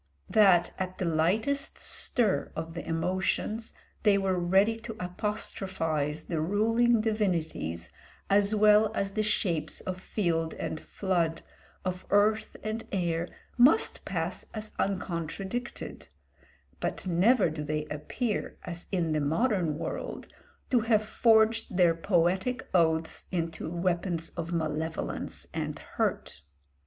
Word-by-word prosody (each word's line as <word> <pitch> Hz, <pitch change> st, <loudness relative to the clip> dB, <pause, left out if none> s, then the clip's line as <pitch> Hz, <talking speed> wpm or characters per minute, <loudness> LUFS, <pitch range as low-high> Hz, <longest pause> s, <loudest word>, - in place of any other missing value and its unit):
That 190 Hz, -5 st, +5 dB
at 185 Hz, -1 st, -3 dB
the 185 Hz, -, -1 dB
lightest 190 Hz, -, +1 dB
stir 225 Hz, -6 st, 0 dB
of 160 Hz, 0 st, -5 dB
the 170 Hz, -, -5 dB
emotions 185 Hz, +6 st, -1 dB, 0.3 s
they 205 Hz, -2 st, +5 dB
were 190 Hz, -2 st, +1 dB
ready 190 Hz, +5 st, +3 dB
to 225 Hz, 0 st, -7 dB
apostrophise 180 Hz, -6 st, -2 dB
the 160 Hz, -3 st, -2 dB
ruling 225 Hz, +6 st, +3 dB
divinities 165 Hz, -, -1 dB, 0.4 s
as 200 Hz, +1 st, +3 dB
well 210 Hz, 0 st, +5 dB
as 195 Hz, 0 st, -1 dB
the 215 Hz, +2 st, 0 dB
shapes 185 Hz, -6 st, 0 dB
of 185 Hz, 0 st, -5 dB
field 165 Hz, -6 st, -1 dB
and 155 Hz, -, -4 dB
flood, 170 Hz, -4 st, -1 dB, 0.4 s
of 180 Hz, 0 st, -3 dB
earth 210 Hz, +2 st, +2 dB
and 220 Hz, +1 st, -3 dB
air, 170 Hz, -3 st, 0 dB, 0.3 s
must 280 Hz, -, +5 dB
pass -, -, -3 dB
as 215 Hz, 0 st, -6 dB
uncontradicted, 190 Hz, +5 st, -3 dB, 0.7 s
but -, -, -3 dB
never 185 Hz, +2 st, +4 dB
do 155 Hz, -1 st, -5 dB
they 150 Hz, +1 st, -2 dB
appear, 155 Hz, -, -3 dB
as 175 Hz, -1 st, -7 dB
in 175 Hz, -4 st, 0 dB
the 155 Hz, -1 st, +1 dB
modern 165 Hz, -, +1 dB
world, -, -, -5 dB, 0.4 s
to 250 Hz, -, +5 dB
have 215 Hz, -1 st, +2 dB
forged 220 Hz, -2 st, +3 dB
their 175 Hz, -3 st, +5 dB
poetic 185 Hz, +7 st, +1 dB
oaths 160 Hz, -2 st, +2 dB
into 165 Hz, -3 st, -2 dB
weapons 175 Hz, -1 st, -1 dB
of 170 Hz, 0 st, -5 dB
malevolence 160 Hz, -1 st, -3 dB
and -, -, -3 dB
hurt. -, -, -2 dB
185 Hz, 125 wpm, -29 LUFS, 165-215 Hz, 0.7 s, That